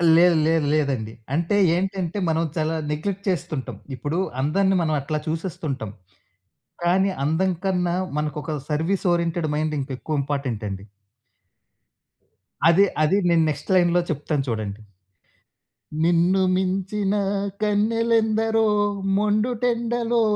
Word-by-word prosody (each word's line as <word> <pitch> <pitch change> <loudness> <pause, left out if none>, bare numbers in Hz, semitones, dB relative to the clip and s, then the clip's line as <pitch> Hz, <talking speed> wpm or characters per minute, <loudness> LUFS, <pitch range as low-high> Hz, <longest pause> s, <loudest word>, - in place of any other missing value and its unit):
లేదు, 175 +1 +6
లేదు, 160 -2 +2
లేదండి! 130 -8 -1 0.2
అంటే 170 +6 +1 0.2
ఏంటంటే, 190 0 -2
మనం 160 +1 +1
చాలా 160 +1 0 0.2
నెగ్లెక్ట్ 190 +6 -3
చేస్తుంటాం. 155 -6 -3 0.2
ఇప్పుడు 145 +6 -3 0.2
అందరిని 190 +7 +2
మనం 155 -2 0
అట్లా 155 +2 -2
చూసేస్తుంటాం. 155 - -3 0.9
కానీ, 190 +3 +3
అందం 170 +6 +1
కన్నా, 180 -2 +1 0.2
మనకొక 150 +1 -3
సర్విస్ 165 +6 0
ఓరియెంటెడ్ 170 -2 -1
మైండ్ 155 0 -1
ఇంకెక్కువ 140 +2 -3
ఇంపార్టెంట్ 135 -6 -3
అండి. 95 0 -6 1.8
అదే 175 +4 +6 0.2
అది 155 +6 +3
నేను 165 -1 +4
నెక్స్ట్ 150 +4 -4
లైన్‌లో 175 -1 +4
చెప్తాను 150 -1 -1
చూడండి. 110 -2 -4 1.2
నిన్ను 175 +3 +3 0.2
మించిన 195 +2 -1 0.5
కన్నెలెందరో 225 +1 +2 0.5
మొండుటెండలో 235 +2 +1
170 Hz, 105 wpm, -23 LUFS, 150-195 Hz, 1.8 s, లేదు